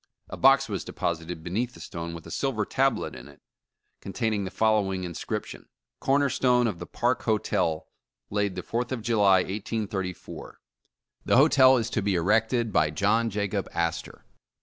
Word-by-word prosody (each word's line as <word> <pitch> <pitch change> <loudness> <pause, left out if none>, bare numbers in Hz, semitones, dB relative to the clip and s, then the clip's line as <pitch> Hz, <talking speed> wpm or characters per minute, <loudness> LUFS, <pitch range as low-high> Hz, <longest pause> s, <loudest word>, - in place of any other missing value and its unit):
A - - -6
box 135 0 +5
was 100 -5 -3
de - - -9
posited 80 0 -3
beneath 115 +8 -2
the - - -13
stone 85 0 -6
with 85 - -10
a - - -10
silver 120 -7 -1
tablet 135 +2 0
in - - -11
it, - - -16 0.6
con 100 - -8
taining 110 -4 -1
the - - -4
following 100 -3 +1
inscription: 85 -2 -5
* - - -63
CORNER 140 +1 +2
STONE 125 -1 +3
OF 105 -7 -2
THE 85 - -7
PARK 120 +1 0
HOTEL 90 -7 0 0.4
Laid 100 -2 0
the - - -5
4th 120 +2 -3
of 120 -4 -3
July, 100 -5 +4
1834, 100 -2 -5 0.7
The - - +3
Hotel 130 -2 +6
is 115 -1 -2
to 110 - 0
be 100 -1 0
erected 110 +5 +1
by 75 - +3
JOHN 105 +8 +1
JACOB 100 -2 -2
ASTOR. 85 -5 -3
105 Hz, 170 wpm, -26 LUFS, 95-120 Hz, 0.7 s, Hotel